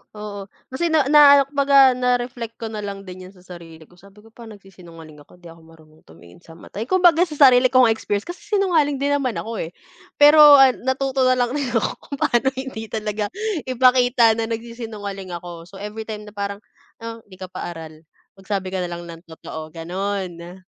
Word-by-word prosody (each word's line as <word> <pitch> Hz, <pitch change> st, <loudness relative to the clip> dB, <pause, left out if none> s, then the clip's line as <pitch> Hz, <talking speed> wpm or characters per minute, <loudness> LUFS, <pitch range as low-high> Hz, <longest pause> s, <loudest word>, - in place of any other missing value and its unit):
Oo, 205 Hz, -2 st, -8 dB, 0.2 s
kasi 340 Hz, +6 st, -1 dB
na 315 Hz, -3 st, +2 dB
na 285 Hz, -2 st, +7 dB
kumbaga 275 Hz, -1 st, +4 dB
na-reflect 245 Hz, -2 st, -2 dB
ko 225 Hz, -1 st, -7 dB
na 215 Hz, -, -6 dB
lang 200 Hz, -1 st, -7 dB
din 185 Hz, 0 st, -11 dB
'yan 195 Hz, -, -18 dB
sa 180 Hz, -, -20 dB
sarili 165 Hz, -3 st, -13 dB
ko 175 Hz, +3 st, -23 dB
sabi 200 Hz, +2 st, -19 dB
ko 225 Hz, -, -19 dB
pa 230 Hz, 0 st, -13 dB
nagsisinungaling 175 Hz, -7 st, -14 dB
ako 145 Hz, -, -19 dB
di 175 Hz, -2 st, -14 dB
ako 165 Hz, -, -17 dB
marunong 155 Hz, -1 st, -20 dB
tumingin 85 Hz, -, -17 dB
sa 165 Hz, -1 st, -16 dB
mata. 180 Hz, -, -11 dB
Kumbaga 355 Hz, -1 st, +3 dB
sa 305 Hz, -, -8 dB
sarili 255 Hz, -3 st, +6 dB
ko 255 Hz, 0 st, +4 dB
nga 225 Hz, -, +4 dB
experience 205 Hz, -2 st, -3 dB
kasi 350 Hz, +1 st, -9 dB, 0.2 s
sinungaling 330 Hz, -7 st, +1 dB
din 280 Hz, +1 st, -2 dB
naman 255 Hz, -4 st, -3 dB
ako, 225 Hz, 0 st, -5 dB
eh, 175 Hz, -, -16 dB, 0.4 s
pero, 295 Hz, +1 st, +6 dB, 0.2 s
ah, 270 Hz, -1 st, +7 dB
natuto 260 Hz, +1 st, -1 dB
na 255 Hz, -, +3 dB
lang 245 Hz, -1 st, -1 dB
din 280 Hz, -1 st, -2 dB
ako 225 Hz, -, 0 dB
kung 280 Hz, -, -9 dB
paano 240 Hz, +3 st, +1 dB
hindi 260 Hz, -4 st, -7 dB
talaga 210 Hz, -1 st, -4 dB, 0.4 s
ipakita 250 Hz, -2 st, +3 dB
na 225 Hz, -, -2 dB
nagsisinungaling 220 Hz, -5 st, -7 dB
ako. 170 Hz, -1 st, -10 dB
So 195 Hz, -, -16 dB
everytime 210 Hz, +1 st, -7 dB
na 210 Hz, -, -12 dB
parang, 200 Hz, 0 st, -6 dB, 0.4 s
ah, 230 Hz, 0 st, -7 dB
hindi 190 Hz, -, -15 dB
ka 185 Hz, 0 st, -10 dB
pa -, -, -6 dB
aral, 160 Hz, -1 st, -11 dB, 0.4 s
magsabi 195 Hz, -1 st, -4 dB
ka 190 Hz, -, -3 dB
na 180 Hz, -, -3 dB
lang 175 Hz, 0 st, -7 dB
ng 165 Hz, 0 st, -12 dB
totoo 160 Hz, -1 st, -9 dB
gano'n. 180 Hz, 0 st, -5 dB
215 Hz, 195 wpm, -21 LUFS, 180-255 Hz, 0.4 s, na